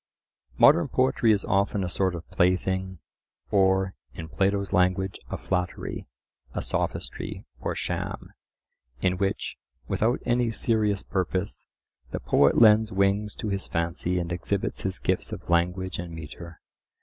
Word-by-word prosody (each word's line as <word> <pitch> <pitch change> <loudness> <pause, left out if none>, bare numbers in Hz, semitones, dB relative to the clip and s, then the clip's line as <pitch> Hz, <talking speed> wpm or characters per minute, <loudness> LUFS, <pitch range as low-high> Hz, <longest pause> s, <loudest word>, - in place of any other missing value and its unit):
Modern 155 +2 +6
poetry 130 -3 +2
is 105 -2 +1
often 100 0 +1
a - - -1
sort 95 0 0
of 85 -1 -8
plaything, 95 +1 +1 0.5
or, 95 -1 +3 0.2
in 80 0 -7
Plato's 100 +5 0
language, 95 +1 +2
a - - -3
flattery, 90 -1 -3 0.5
a - - -2
sophistry, - - -3
or - - -3
sham, - - -4 0.7
in 90 +3 +1
which, 100 -1 -1 0.3
without 120 +4 +1
any 120 -1 +2
serious 110 -3 +1
purpose, 95 0 -2 0.4
the - - -4
poet 70 - +3
lends 110 -1 +6
wings 100 +2 +1
to 110 - -4
his 100 -1 -2
fancy 85 +2 -1
and 85 -1 -2
exhibits 95 +3 -2
his 95 -1 -2
gifts - - 0
of - - -7
language 90 +2 +1
and 85 -1 -6
metre. 80 +2 -9
95 Hz, 135 wpm, -26 LUFS, 90-105 Hz, 0.7 s, Modern